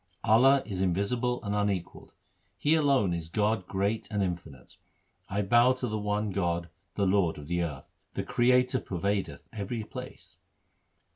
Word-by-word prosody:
Allah 130 +6 +5
is 95 -4 -3
invisible 115 +7 0
and 100 -1 -2
unequalled; 100 -4 -2 0.5
He 150 - +2
alone 140 - +3
is 85 -1 -4
God 105 0 0
great 100 +3 -1
and 105 -2 0
infinite. 85 -8 -6 0.5
I 100 +2 0
bow 120 +5 +5
to 130 -1 -3
the 110 -1 -2
one 105 0 -1
God, 85 -2 -1 0.3
the 100 - +1
Lord 95 -4 +2
of 75 - -9
the 85 +3 -1
earth: 75 -6 -4 0.3
The - - -1
Creator 125 +1 +3
pervadeth 100 +2 -3
every 110 +2 -4
place. 105 - -10
100 Hz, 150 wpm, -29 LUFS, 90-120 Hz, 0.5 s, Allah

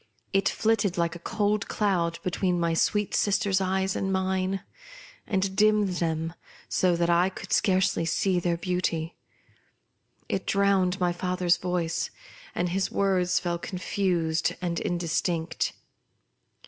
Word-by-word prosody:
It 195 0 +3
flitted 210 -5 +1
like 170 0 0
a - - -8
cold 210 +2 0
cloud 175 -5 0
be 180 - -1
tween 180 -1 0
my 170 -1 +1
sweet 205 +5 +1
sister's 200 -2 +2
eyes 190 0 0
and 195 - -1
mine, 190 0 0 0.6
and 190 -1 0
dimmed 210 -3 +3
them 165 -1 -1 0.3
so 180 -2 +2
that 170 0 +1
I 175 +2 +4
could 190 - -6
scarcely 190 -3 +2
see 180 +2 +1
their 170 -1 0
beauty. 175 -2 -2 1.1
It - - -2
drowned 195 -2 +2
my 175 -1 +1
father's 180 0 +1
voice, 180 -2 -1 0.5
and 175 0 0
his 190 +2 0
words 180 -2 +2
fell 175 -1 -2
confused 175 -3 -1
and 175 -2 -2
indistinct. 170 -1 -1
180 Hz, 135 wpm, -27 LUFS, 170-195 Hz, 1.1 s, I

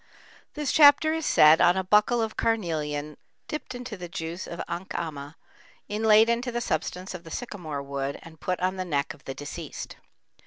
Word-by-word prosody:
This 295 -3 -1
chapter 300 +1 +6
is 320 -1 -2
said 155 +1 +6
on 175 +2 +5
a 190 - 0
buckle 210 +5 +3
of 220 - -4
carnelian 155 -9 -1 0.3
dipped 305 -4 -5
into 245 -2 -6
the 175 -3 -8
juice 170 0 -5
of 170 - -7
ankhama, 160 -4 -5 0.5
inlaid 215 +1 +4
into 235 +2 0
the 240 - -2
substance 185 -5 -3
of 180 -2 -8
the 165 - -11
sycamore 160 - -5
wood 140 0 -4
and 160 -2 -14
put 180 -1 -2
on 185 +1 0
the 185 - -2
neck 145 -4 -1
of 150 - -20
the 135 - -5
deceased. 145 - -7
180 Hz, 180 wpm, -26 LUFS, 155-225 Hz, 0.5 s, chapter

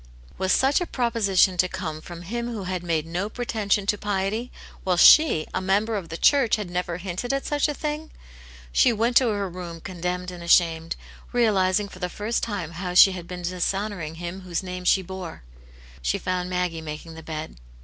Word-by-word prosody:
Was 190 0 +1
such 270 - +3
a 355 - -2
proposition 205 -7 +2
to 180 - +3
come 160 -5 -5
from 175 +1 -9
him 235 +6 -3
who 225 -4 -4
had 185 -1 -3
made 165 -3 -1
no 180 +5 -3
pretension 215 -4 -1
to 205 0 0
piety, 205 +4 -2 0.3
while 180 -2 +1
she, 230 - +7
a 185 - -1
member 205 +4 +1
of 190 -5 -4
the 165 - -5
church, 270 -2 +4
had 205 -5 -5
never 175 -1 -2
hinted 185 +7 -4
at 275 0 -1
such 295 0 +1
a 295 - -2
thing? 300 +1 -4 0.6
She 240 - +5
went 230 +2 0
to 255 - +5
her 205 -2 -1
room 175 -2 -7
condemned 180 +1 -4
and 175 -1 -9
ashamed, 165 -1 +3 0.4
realizing 205 -4 +2
for 185 - -13
the 180 -1 -2
first 215 +5 -2
time 200 -8 -3
how 180 +1 -5
she 195 +2 +9
had 180 -2 -7
been 180 -1 -7
dishonouring 180 -1 -2
Him 175 +3 -6
whose 180 -1 -3
name 180 0 -6
she 190 +1 +4
bore. 185 - -8 0.6
She - - 0
found 180 -1 -2
Maggie 180 -3 -1
making 155 +1 -7
the 160 - -9
bed. 155 - -6
185 Hz, 195 wpm, -25 LUFS, 175-210 Hz, 0.6 s, she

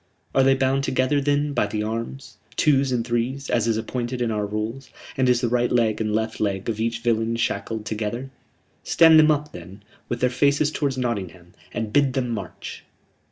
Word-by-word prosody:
Are 135 - +4
they 135 0 +5
bound 135 +1 +1
together, 130 +2 +1
then, 145 +1 +1
by 105 - +1
the 105 +1 -2
arms, 115 +1 -5 0.2
twos 135 -3 +3
and 120 -2 0
threes, 125 +3 -2
as 115 -2 +2
is 115 -1 +1
appointed 120 +2 -3
in 120 -2 0
our 105 -1 -1
rules; 110 +6 -4 0.3
and 130 -1 +2
is 120 -1 +3
the 120 - +1
right 120 +1 +1
leg 115 -3 +2
and 110 -1 -1
left 110 +1 -1
leg 100 -2 -1
of 110 -1 -3
each 115 +1 -1
villain 115 -1 +1
shackled 110 -1 -2
together?... 110 +5 -4 0.5
Stand 160 -1 +6
them 155 0 +6
up, 150 0 0
then, 90 +4 -11 0.3
with 120 - -2
their 125 0 +2
faces 145 +3 +2
toward 140 -4 -1
Nottingham, 95 -8 -4 0.2
and 110 -1 -4
bid 140 -3 +3
them 125 -2 -1
march." 100 -7 -6
120 Hz, 195 wpm, -23 LUFS, 110-135 Hz, 0.5 s, Stand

